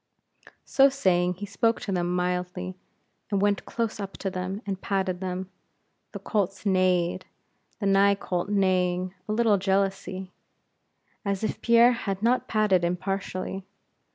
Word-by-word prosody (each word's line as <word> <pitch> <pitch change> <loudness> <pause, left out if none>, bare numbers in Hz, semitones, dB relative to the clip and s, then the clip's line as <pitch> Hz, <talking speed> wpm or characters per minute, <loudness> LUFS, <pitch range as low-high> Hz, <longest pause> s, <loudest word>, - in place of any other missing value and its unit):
So 275 0 +5
saying, 180 -9 +1
he 205 +3 -6
spoke 225 +3 +1
to 200 - -4
them 175 -1 0
mildly, 180 +1 -2 0.5
and 200 -2 +1
went 205 0 +1
close 230 -2 -2
up 195 -1 -5
to 195 - -3
them, 185 +3 -4
and 195 -2 -4
patted 190 -2 -1
them. 185 0 -4 0.6
The - - -4
colts 200 -2 -2
neighed; 185 -2 +2 0.5
the 205 - -3
nigh 200 0 +5
colt 180 -1 -3
neighing 185 -2 +1 0.2
a - - +1
little 215 -2 +3
jealously, 190 -1 -1 0.9
as 200 -1 -2
if 220 - -2
Pierre 235 +1 +6
had 200 -4 -3
not 245 +2 +2
patted 210 -5 +2
impartially. 185 +1 -3
195 Hz, 140 wpm, -26 LUFS, 185-205 Hz, 0.9 s, Pierre